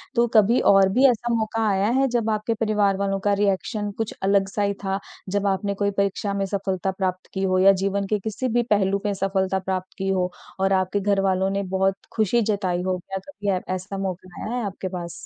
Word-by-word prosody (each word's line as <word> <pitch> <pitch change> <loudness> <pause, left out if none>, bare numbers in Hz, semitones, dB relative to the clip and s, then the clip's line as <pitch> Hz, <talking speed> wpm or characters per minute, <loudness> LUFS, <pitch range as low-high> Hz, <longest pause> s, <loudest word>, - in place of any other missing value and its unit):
तो 235 0 +4
कभी 215 +3 +5
और 195 -1 +5
भी 260 +5 +4
ऐसा 240 0 0
मौका 225 0 0
आया 195 +1 +2
है? 270 - +3
जब 235 -3 0
आपके 215 +1 0
परिवार 210 -3 +1
वालों 195 0 -1
का 205 - +4
रिएक्शन 205 +1 0
कुछ 225 -1 -2
अलग-सा 195 +1 +1
ही 200 0 +1
था? 195 0 -1 0.3
जब 200 +1 0
आपने 200 +1 0
कोई 200 - +2
परीक्षा 200 +1 0
में 200 0 -1
सफलता 195 -1 -2
प्राप्त 185 -1 -3
की 190 - -2
हो? 185 -1 +2
या 195 +1 +7
जीवन 200 0 0
के 210 +1 0
किसी 220 +5 -3
भी 240 0 +3
पहलू 200 -1 +1
में 205 - +1
सफलता 190 -1 0
प्राप्त 185 0 -4
की 195 0 -2
हो 185 -1 0 0.3
और 195 0 +2
आपके 190 +2 +1
घर 200 0 +1
वालों 190 0 +1
ने 200 0 -1
बहुत 190 0 +2 0.2
खुशी 220 +2 +2
जताई 195 -5 0
हो? 185 0 0
क्या 195 +2 -6
कभी 210 -8 -4
ए 180 - -2
ऐसा 190 +2 -6
मौका 185 -2 -5
आया 225 +3 -3
है 245 - -2
आपके 190 -1 -4
पास? 175 -2 -5
195 Hz, 220 wpm, -23 LUFS, 190-210 Hz, 0.3 s, या